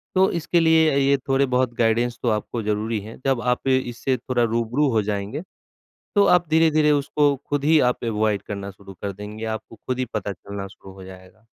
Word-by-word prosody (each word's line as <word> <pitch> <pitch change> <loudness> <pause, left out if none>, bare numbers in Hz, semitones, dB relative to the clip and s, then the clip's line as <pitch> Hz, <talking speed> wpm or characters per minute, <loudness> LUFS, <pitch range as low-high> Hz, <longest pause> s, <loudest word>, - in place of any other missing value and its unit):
तो 190 +1 +4
इसके 170 0 0
लिए 160 -2 +4
ये 140 0 +3
थोड़े-बहुत 130 -2 +1
गाइडेंस 120 +1 +1
तो 120 - +2
आपको 110 +2 -2
ज़रूरी 105 +1 -1
हैं। 110 +4 -11
जब 135 -3 +1
आप 125 +2 -1
ए, 130 -1 +4
इससे 130 +1 -2
थोड़ा 120 0 -1
रूबरू 120 +5 +1
हो 110 -1 +2
जाएँगे, 105 +8 -3 0.7
तो 200 - +5
आप 175 -2 +4
धीरे-धीरे 155 -1 +4
उसको 145 0 +2
खुद 145 -1 -1
ही 160 0 +5
आप - - -10
अवॉइड 110 -2 0
करना 100 -1 -6
शुरू 95 0 -13
कर 100 - -3
देंगे। 105 +3 -7
आपको 110 +1 -17
खुद 130 0 -2
ही 130 - 0
पता 105 -1 -2
चलना 100 +2 -7
शुरू 95 0 -14
हो 95 -1 -12
जाएगा। 95 +4 -14
120 Hz, 195 wpm, -23 LUFS, 105-140 Hz, 0.7 s, तो